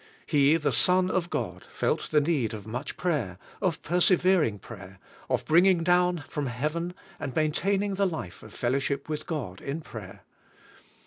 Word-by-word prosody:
He, 145 +1 +4
the 150 -2 0
Son 185 0 +3
of 175 -2 0
God, - - -3
felt - - -1
the 150 - +4
need 145 -8 0
of 105 -2 -9
much 115 +3 -5
prayer, 140 - -1 0.2
of 185 -5 0
persevering 180 - +3
prayer, 100 -2 -11 0.3
of - - 0
bringing 175 +2 +5
down 180 -2 +3
from 145 -2 -3
heaven 155 +8 -2 0.2
and 135 -3 -5
maintaining 195 +6 +1
the 195 0 +2
life 155 - -6
of 110 - -12
fel 120 +2 -1
lowship 140 +1 -1
with 155 -1 -4
God 125 - -4
in 145 +4 -4
prayer. 105 -10 -10
155 Hz, 165 wpm, -28 LUFS, 125-180 Hz, 0.3 s, bringing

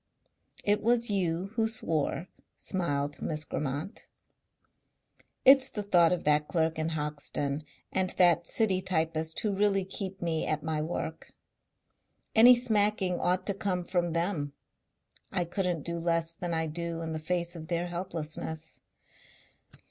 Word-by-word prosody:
"It 205 0 +2
was 235 0 +2
you 185 -1 0
who 225 -1 +2
swore," 165 -5 -1 0.3
smiled 145 -6 -1
Miss 155 -1 -2
Grammont. 150 - -4 1.4
"It's 270 0 +7
the 210 - -4
thought 175 -4 +4
of 180 - 0
that 150 0 +3
clerk 160 -2 0
in 155 +1 0
Hoxton 150 -1 -3 0.3
and 185 -1 +1
that 175 -2 +4
city 195 -5 +2
typist 160 -3 -1
who 210 - 0
really 195 -1 +2
keep 190 0 -5
me 165 -2 -1
at 155 -1 -1
my 155 -1 -1
work. 160 0 -4 1.0
Any 240 +3 +9
smacking 210 -6 +2
ought 180 +1 +1
to 200 - +1
come 190 -3 -1
from 175 -2 0
them. 165 -4 -1 0.8
I 175 - 0
couldn't 175 -3 -1
do 170 0 -3
less 165 0 0
than 175 +1 -4
I 160 -1 0
do 165 +1 -3
in 160 - -4
the 160 - -3
face 175 +2 -1
of 160 -1 -8
their 170 +1 -1
helplessness. 160 -3 -5
170 Hz, 140 wpm, -30 LUFS, 160-190 Hz, 1.4 s, Any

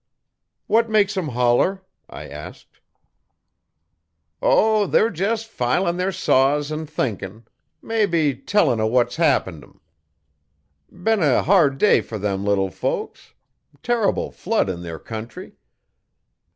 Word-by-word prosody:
'What 230 +1 +2
makes 210 -1 +2
'em 185 -5 -2
holler?' 125 +10 +1 0.3
I - - -9
asked. 75 +2 -11 1.6
'O, 215 -2 +3
they're 225 0 +2
jes' 210 +6 -1
filin' 170 - -1
their 185 +1 -1
saws 145 -2 +1
an' 155 0 -4
thinkin'. 110 -7 -4 0.4
Mebbe 170 - 0
tellin' 155 - +2
o' 110 - +1
what's 120 +3 +1
happened 135 - +1
'em. - - -21 1.1
Been 205 +3 0
a 145 -6 +3
hard 160 -7 +3
day 210 - +4
fer 110 - -7
them 100 -1 -2
little 100 -2 0
folks. - - -5 0.5
Terrible 235 -3 0
flood 215 - -1
in 85 -1 -7
their 85 -2 -7
country. 110 +7 -9
150 Hz, 120 wpm, -21 LUFS, -, 1.6 s, day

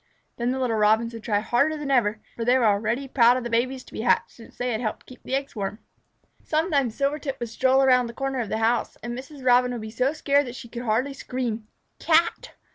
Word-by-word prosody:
Then 235 0 -1
the 260 - -1
little 250 -4 0
Robins 220 +2 +3
would 230 - -7
try 210 -2 0
harder 280 +8 +1
than 290 -2 -4
ever, 220 -5 +2 0.2
for 230 - -3
they 245 +2 +4
were 245 - +2
already 220 +6 +1
proud 245 -1 +5
of 255 - -4
the 240 - -5
babies 255 +3 0
to - - -17
be - - -4
hatched, 240 +1 +2
since 230 - -16
they 245 0 -1
had 220 0 -2
helped 215 -3 -4
keep 255 - -14
the 265 - -2
eggs 275 -1 -3
warm. 200 0 -3 0.7
Sometimes 300 -7 0
Silvertip 280 0 -2
would 240 -1 -4
stroll 260 +4 +3
around 250 -2 +4
the 235 - -8
corner 270 +1 -2
of 225 -4 -3
the - - -1
house, 225 +2 0
and 240 +1 -4
Mrs. 265 +1 -10
Robin 250 0 +4
would 240 - -5
be 215 0 -7
so 255 +4 +1
scared 285 -2 +1
that 245 - -7
she 240 - -9
could 235 +1 -6
hardly 245 +6 0
scream 240 -5 -4 0.3
"Cat!" 340 +9 +1
245 Hz, 240 wpm, -25 LUFS, 230-270 Hz, 0.7 s, proud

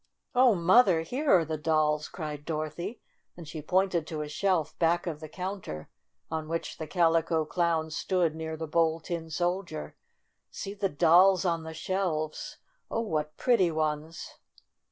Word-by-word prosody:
"Oh, 250 -3 +5
Mother, 180 0 +5
here 265 - -3
are 170 -3 +5
the 155 0 -3
dolls!' 150 -1 +1
9 - - -17
cried 150 -4 -6
Dorothy, 160 +7 -4 0.4
and 170 -3 -9
she 155 0 -6
pointed 180 0 +1
to 155 -2 -3
a - - -6
shelf 160 0 0
back 170 +1 +2
of 160 -4 -4
the 155 -1 -9
counter 180 - -6 0.4
on 160 -1 -3
which 165 +1 -4
the 160 - -4
Calico 165 -1 +2
Clown, 165 -1 0
stood 170 +1 0
near 160 0 -5
the 160 - -4
Bold 160 0 +1
Tin 165 -2 -4
Soldier. 175 - -2 0.5
"See 195 - -6
the 200 -1 -1
dolls 180 +5 +5
on 170 -2 +1
the 160 0 -8
shelves! 185 - -2 0.3
Oh, 225 - -1
what 155 -8 -2
pretty 230 -9 +3
ones!" 155 +1 -3
165 Hz, 160 wpm, -29 LUFS, 155-185 Hz, 0.5 s, Oh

